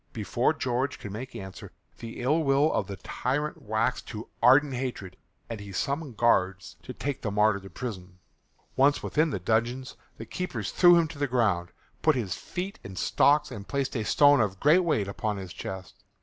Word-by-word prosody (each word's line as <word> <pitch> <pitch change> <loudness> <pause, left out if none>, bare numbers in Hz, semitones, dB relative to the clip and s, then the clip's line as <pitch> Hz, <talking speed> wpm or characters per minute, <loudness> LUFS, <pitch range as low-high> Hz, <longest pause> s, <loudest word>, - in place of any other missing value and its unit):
Before 115 +4 +1
George 130 -2 -1
could 110 -6 -8
make 125 +6 -7
answer 95 -1 -8 0.3
the 115 +1 -7
ill 145 +6 +2
will 140 +2 +3
of 100 - 0
the 100 - -5
tyrant 140 +10 -3
waxed 110 +3 -1
to 110 +1 -7
ardent 135 +4 +5
hatred 120 -8 -4 0.3
and 115 -2 -6
he 100 -1 -9
summoned 140 - -3
guards 95 -5 +1
to - - -8
take 140 -2 -4
the 110 - -2
martyr 105 0 +2
to 95 0 -12
prison. 90 -3 -7 0.6
Once 140 +2 +3
within 155 +2 +1
the 140 - -2
dungeon 115 +7 0 0.3
the - - -7
keepers 120 - -4
threw 175 -1 +6
him 165 -1 +3
to 150 -3 -10
the 145 - +1
ground, 105 -9 +1 0.3
put 155 -2 +4
his 110 -8 -2
feet 185 +3 -6
in 95 - -9
stocks 145 +9 +3
and 100 -2 -8
placed 140 -2 -2
a 115 - -1
stone 145 +3 +5
of 95 -3 -1
great 155 +5 +5
weight 150 - +1
upon 105 +1 -3
his 95 -3 -7
chest. 95 -1 -8
120 Hz, 190 wpm, -27 LUFS, 100-145 Hz, 0.6 s, threw